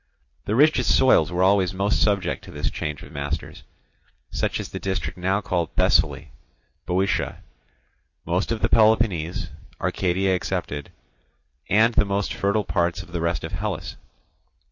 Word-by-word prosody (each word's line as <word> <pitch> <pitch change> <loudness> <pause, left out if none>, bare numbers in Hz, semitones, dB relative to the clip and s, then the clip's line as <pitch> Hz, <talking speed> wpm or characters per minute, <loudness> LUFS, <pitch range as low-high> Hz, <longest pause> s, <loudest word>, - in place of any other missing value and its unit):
The 105 - -1
richest 140 -2 +4
soils 90 - +4
were 90 +1 +1
always 95 -1 +3
most 100 +2 +1
subject 100 -4 +1
to 95 - -11
this 75 -3 -2
change 75 -3 -4
of - - -12
masters; 70 +2 -5 0.7
such - - -1
as - - -5
the - - -6
district 95 -4 -3
now 95 +3 0
called 85 -3 -2
Thessaly, - - +2 0.6
Boeotia, 95 +2 -1 0.8
most 90 +6 -1
of 115 - -2
the - - +4
Peloponnese, 110 -7 +2 0.3
Arcadia 95 +1 0
excepted, 70 -5 -3 0.8
and 110 +3 +4
the - - +4
most 100 0 -1
fertile 100 +2 0
parts 85 +2 0
of 90 - -16
the 85 -1 -3
rest 85 -1 -1
of - - -5
Hellas. - - -4
95 Hz, 145 wpm, -24 LUFS, 85-100 Hz, 0.8 s, richest